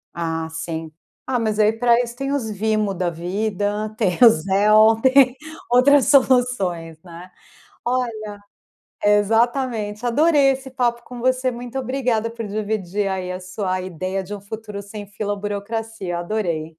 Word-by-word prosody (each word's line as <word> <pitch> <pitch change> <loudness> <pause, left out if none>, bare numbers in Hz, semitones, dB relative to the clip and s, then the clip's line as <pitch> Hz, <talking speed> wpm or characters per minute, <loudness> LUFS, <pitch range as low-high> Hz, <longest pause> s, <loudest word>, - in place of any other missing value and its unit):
Ah, 165 -1 -2
sim. 160 0 -5 0.3
Ah, 250 -2 0
mas 215 -2 -1
aí 215 +1 +4
pra 235 +1 +3
isso 235 0 -6
tem 275 +2 -3
os 240 -7 -2
Venmo 215 -1 0
da 180 -1 -1
vida, 205 +4 -2
tem 180 -4 0
o 235 - +10
Zelle 215 +5 +4
tem 260 -1 +5 0.4
outras 265 +2 +5
soluções 245 - +2
né. 175 +1 -12 0.5
Olha 250 -1 0 0.9
exatamente, 225 +1 +1
adorei 285 +2 +4
esse 265 0 -5
papo 240 -2 -1
com 250 -1 -10
você, 255 0 +1
muito 245 +2 -7
obrigada 250 -3 -1
por 230 -1 -6
dividir 205 -2 -2
aí 185 -1 -3
a 185 - -5
sua 185 0 -3
ideia 185 +2 -4
de 205 +3 -8
um 200 - -10
futuro 210 0 -7
sem 205 +1 -9
fila, 205 0 -3
burocracia. 205 -2 -4
Adorei. 175 -4 -2
215 Hz, 145 wpm, -21 LUFS, 190-245 Hz, 0.9 s, o